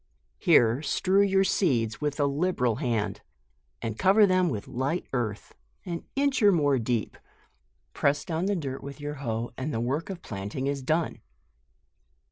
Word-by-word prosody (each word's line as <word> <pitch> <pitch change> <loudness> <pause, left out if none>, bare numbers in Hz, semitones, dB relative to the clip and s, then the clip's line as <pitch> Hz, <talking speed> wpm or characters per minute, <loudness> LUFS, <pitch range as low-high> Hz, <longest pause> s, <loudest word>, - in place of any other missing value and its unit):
Here 125 - +4
strew 190 +5 +2
your 195 -1 +3
seeds 120 - +1
with 150 0 -2
a 145 - +3
liberal 140 -6 0
hand, 120 -7 -1 0.6
and 110 -2 -4
cover 200 +3 +6
them 185 -2 +3
with 105 -8 -4
light 135 +8 -2
earth, 110 -5 -3 0.3
an 170 -2 -5
inch 275 -1 +1
or 205 -1 +7
more 145 -6 +2
deep; 115 -1 -1 0.8
press 145 +1 +1
down 165 +2 -1
the 205 - +1
dirt 135 -6 -4
with 140 +1 -8
your 145 0 -5
hoe, 115 -2 -3
and 140 +4 -2
the 115 - -2
work 135 +9 -2
of 185 -3 -7
planting 105 +6 -5
is 140 0 -1
done. 155 +5 -1
145 Hz, 160 wpm, -27 LUFS, 120-180 Hz, 0.8 s, or